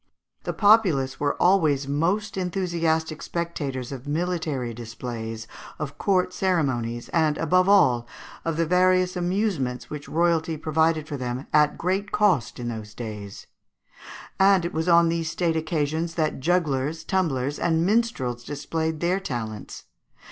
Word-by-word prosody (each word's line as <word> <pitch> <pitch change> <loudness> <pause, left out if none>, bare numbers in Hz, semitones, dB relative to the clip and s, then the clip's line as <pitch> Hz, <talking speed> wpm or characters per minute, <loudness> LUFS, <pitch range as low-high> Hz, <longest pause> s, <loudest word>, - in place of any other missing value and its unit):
The - - -2
populace 190 -12 +3
were 145 0 0
always 155 -7 +3
most 175 +9 0
enthusiastic 170 -4 -1
spectators 145 -7 -4
of 135 0 -7
military 155 -6 -2
displays, 115 -1 -6 0.3
of 145 -1 -6
court 185 -2 +1
ceremonies, 130 -12 -1
and, 155 -3 +2
above 185 +3 +3
all, 125 -12 +4 0.4
of 165 -1 -2
the 165 - +2
various 185 +1 +3
amusements 175 - -1
which 150 -1 -7
royalty 165 -1 +1
provided 160 0 +1
for 145 - -4
them 125 +1 -4
at 150 -1 +4
great 190 +3 -1
cost 180 - +2
in 120 - -4
those 110 -3 -6
days: 105 -4 -7 0.9
and 190 -2 +5
it 170 - -3
was 160 +2 -1
on 170 0 +6
these 165 -1 -1
state 165 0 0
occasions 160 +1 -1
that 155 -4 0
jugglers, 160 -1 0
tumblers, 145 -7 -1
and 165 -1 +1
minstrels 190 - 0
displayed 160 +3 -3
their 180 +3 +1
talents. 115 - -6
160 Hz, 135 wpm, -25 LUFS, 135-180 Hz, 0.9 s, on